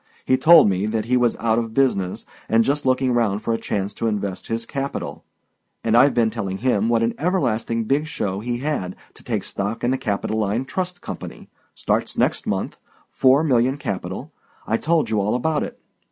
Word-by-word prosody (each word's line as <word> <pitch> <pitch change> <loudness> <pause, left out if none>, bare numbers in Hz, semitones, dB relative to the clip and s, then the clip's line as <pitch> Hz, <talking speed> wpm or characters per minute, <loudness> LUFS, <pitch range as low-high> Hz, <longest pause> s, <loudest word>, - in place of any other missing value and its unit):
He 130 - +4
told 165 -1 +7
me 95 +1 0
that 110 -1 -1
he 125 +2 +1
was 120 -2 +2
out 115 0 +1
of 115 -1 -5
business, 100 -9 +1 0.2
and 115 +1 +4
just 140 +2 0
looking 130 0 +2
round 110 -4 +1
for 115 - 0
a - - +1
chance 100 0 -2
to 115 - -2
invest 100 -3 -3
his 115 0 -2
capital. 140 +3 -4 0.6
And 115 0 +2
I've 135 +4 +5
been 115 -2 +3
telling 100 -4 -3
him 115 -2 +1
what 115 -1 +2
an 115 - +1
everlasting 120 - 0
big 140 +7 0
show 100 -11 -3
he 120 +3 -2
had 120 -10 -3 0.2
to - - -16
take - - -2
stock 100 +3 -4
in 120 - +2
the 130 - 0
Capitoline 110 0 -1
Trust 180 +4 -4
Company—starts - - -5
next - - +1
month—four 135 +3 0
million 130 -2 +2
capital—I 110 - -5
told 160 -4 +1
you 105 -2 +2
all 105 +4 0
about 150 +5 0
it. - - -6
115 Hz, 180 wpm, -22 LUFS, 105-135 Hz, 0.6 s, told